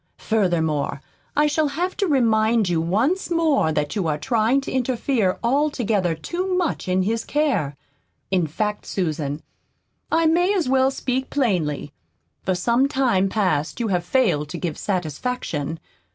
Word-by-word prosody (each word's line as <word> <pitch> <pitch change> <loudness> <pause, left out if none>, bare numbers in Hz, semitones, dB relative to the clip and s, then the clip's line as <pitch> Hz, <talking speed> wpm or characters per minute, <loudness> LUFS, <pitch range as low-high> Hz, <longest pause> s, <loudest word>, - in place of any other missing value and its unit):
Furthermore, 160 -9 0 0.4
I 295 - +4
shall 300 +1 +2
have 345 +6 -2
to 400 - +1
remind 225 - +3
you 170 -2 +1
once 230 - 0
more 320 - +2
that 150 -1 -1
you 190 -6 0
are 150 -1 0
trying 225 - +2
to - - -6
interfere 245 -5 0
altogether 235 - +1
too 360 - -2
much 350 - -1
in 185 0 +2
his 225 +3 -1
care. 255 - 0 0.6
In 180 -4 +2
fact, 210 +7 -3
Susan, 155 -5 -2 0.7
I 330 0 +3
may 350 +5 +3
as 345 -8 0
well 265 0 +3
speak 260 -1 -2
plainly. 170 - -1 0.5
For 185 - 0
some 235 +8 +2
time 245 -9 +1
past 180 -7 0
you 230 -2 -1
have 180 -2 +1
failed 175 - +1
to 175 - -5
give 165 -3 -3
satisfaction. 165 - -3
220 Hz, 150 wpm, -22 LUFS, 170-270 Hz, 0.7 s, I